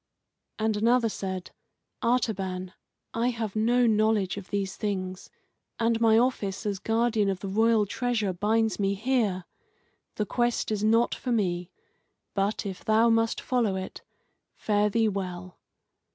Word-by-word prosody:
And 220 0 0
another 230 +2 +3
said: 190 -3 -5 0.5
"Artaban, 190 -6 -1 0.4
I 230 +1 +1
have 225 -4 -4
no 240 +3 +3
knowledge 215 -3 +2
of 200 -2 -8
these 195 -2 -2
things, 185 -3 -4 0.5
and 230 0 +1
my 225 -1 +5
office 225 -5 0
as 200 -2 -1
guardian 225 -2 +1
of 190 -1 -2
the 195 - -4
royal 220 +2 +3
treasure 220 -2 -1
binds 220 +4 +1
me 200 0 +1
here. 215 -5 0 0.7
The 210 - -1
quest 240 +1 0
is 210 -1 -1
not 230 +2 +3
for 250 - -4
me. 180 -6 0 0.6
But 200 +2 -1
if 190 -2 -6
thou 220 +2 +4
must 225 0 +2
follow 235 -6 0
it, 190 0 -6 0.5
fare 210 -1 +1
thee 225 +1 +2
well." 185 -3 -5
215 Hz, 140 wpm, -27 LUFS, 195-230 Hz, 0.7 s, my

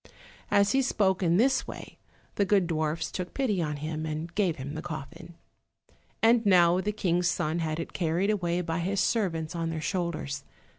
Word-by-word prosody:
As 200 0 +4
he 270 - +3
spoke 200 -7 +1
in 170 -1 +3
this 260 +4 +2
way - - -9 0.3
the 205 - +1
good 195 -1 +3
dwarfs 160 -1 -1
took 180 -1 -5
pity 220 -9 0
upon 150 -2 -2
him, 155 +2 -4
and 160 +2 -4
gave 185 -5 +1
him 140 +2 -6
the 155 - -5
coffin. 165 +1 -8 0.9
And 230 +1 +5
now 180 -3 +5
the 210 - -1
King's 180 -4 0
son 160 -1 0
had 160 -1 -2
it 165 - -5
carried 180 +4 +1
away 175 -4 0
by 165 -1 -2
his 190 +3 -1
servants 170 -7 0
on 165 -1 -2
their 165 -1 -3
shoulders. 155 -5 -3
175 Hz, 185 wpm, -28 LUFS, 160-195 Hz, 0.9 s, And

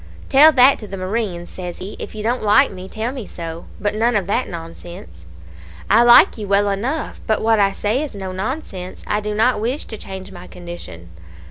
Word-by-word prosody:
"'Tell 295 +3 +8
that 265 -1 +5
to 210 - -9
the 195 - -7
marines,' 185 -2 -3
says 180 -2 -7
he. 190 +3 -7
'If - - -7
you 210 - -5
don't 240 +3 0
like 210 -1 +4
me, 185 0 -9
tell 225 +4 -3
me 255 -7 -7
so; 165 -1 -7
but 205 0 -1
none 230 +2 +1
of 200 -3 +1
that 210 +7 -1
nonsense.' 165 - -10 0.7
"'I 220 +3 +6
like 240 -1 +7
you 210 - -5
well 200 +1 +2
enough; 250 +11 -3
but 220 - +2
what 225 -1 +3
I 200 -1 +3
say 215 +6 -1
is 295 -7 -5
no 190 -2 -5
nonsense. 190 - -5
I 210 - 0
do 210 0 -4
not 225 0 +2
wish 250 +6 -2
to 220 - -8
change 190 0 -8
my 180 -1 -11
condition.' 170 - -10
205 Hz, 210 wpm, -20 LUFS, 185-230 Hz, 0.7 s, Tell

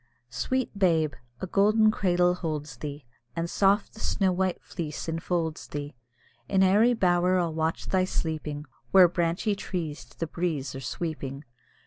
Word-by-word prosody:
Sweet 255 - -1
babe! 165 -6 +2 0.3
a - - -1
golden 215 +3 +4
cradle 180 -3 +2
holds 150 -6 -4
thee, 145 0 -6 0.3
And 165 0 -1
soft 200 +4 +2
the 220 - -13
snow 195 -3 +1
white 185 0 0
fleece 160 -3 -6
enfolds 165 0 -2
thee; 145 0 -5 0.6
In 190 -1 +4
airy 215 +6 +5
bower 180 -2 +3
I'll 170 -3 0
watch 160 +1 -1
thy 185 -1 +2
sleeping, 155 -4 -3 0.2
Where 185 -2 +8
branchy 175 +4 0
trees 170 -8 -4
to 115 -1 -22
the 165 - -1
breeze 155 -5 -2
are 135 - -6
sweeping. 140 0 -4
170 Hz, 150 wpm, -27 LUFS, 155-190 Hz, 0.6 s, Where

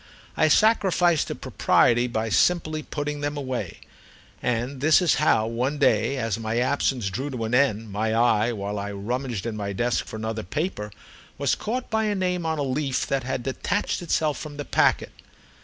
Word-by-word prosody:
I 155 - +3
sacrificed 180 -3 +3
to - - -4
propriety 120 +1 +2
by 115 -2 -2
simply 155 +5 +2
putting 145 -1 -4
them 145 0 -2
away, 130 - -4 0.6
and 125 +3 -2
this 155 +2 +5
is 180 -4 +3
how, 110 -7 +3
one 125 +6 -1
day 115 -1 +2
as 115 -4 -2
my 110 +1 -2
absence 125 -4 0
drew 130 +9 -3
to 125 -4 -4
an 110 - -4
end, 115 -5 +2
my 110 +2 -1
eye, 115 -1 +3
while 100 -2 -4
I 100 +1 -4
rummaged 120 +2 -3
in 115 -2 -3
my 100 -1 -3
desk 120 +5 0
for - - -8
another 110 0 -3
paper, 105 - -3 0.5
was - - +1
caught 245 +3 -3
by 220 0 +1
a 210 -1 0
name 180 -3 -1
on 160 0 -1
a 145 - -1
leaf 135 0 -1
that 135 -1 -1
had 125 -1 -3
detached 190 +13 -2
itself 155 -3 0
from 150 -2 -8
the 145 - -5
packet. - - +2
130 Hz, 185 wpm, -25 LUFS, 110-155 Hz, 0.6 s, this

